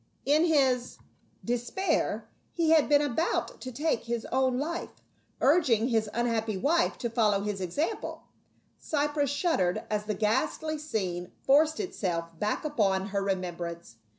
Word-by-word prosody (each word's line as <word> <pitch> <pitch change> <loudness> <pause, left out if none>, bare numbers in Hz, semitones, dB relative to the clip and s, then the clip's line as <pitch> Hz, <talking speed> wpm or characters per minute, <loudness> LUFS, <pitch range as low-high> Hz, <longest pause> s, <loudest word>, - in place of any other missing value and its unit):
In 300 +4 +4
his 265 -6 +2
42 - - -25
PA - - -27 0.4
UL. - - -16
despair 245 +11 -1 0.2
he 330 -2 +2
had 315 -3 +5
been 290 0 +5
about 290 +4 -1
to 255 - -6
take 290 -1 -1
his 235 -1 -3
own 260 -1 +2
life, 330 +5 -3 0.5
urging 260 -6 +3
his 220 -3 +1
unhappy 225 -3 -1
wife 330 - +2
to 240 - -2
follow 210 -4 +2
his 205 -1 -3
example. 290 - -3 0.6
Cypros 295 -1 0
shud 305 - +1
dered 180 -1 +1
as 210 0 -1
the 210 -1 -2
ghastly 265 +8 0
scene 185 - -3
forced 305 +3 +4
itself 175 - -2
back 210 +8 -1
upon 200 -9 +1
her 200 0 -1
remembrance. 175 -7 -4
240 Hz, 150 wpm, -28 LUFS, 205-295 Hz, 0.6 s, had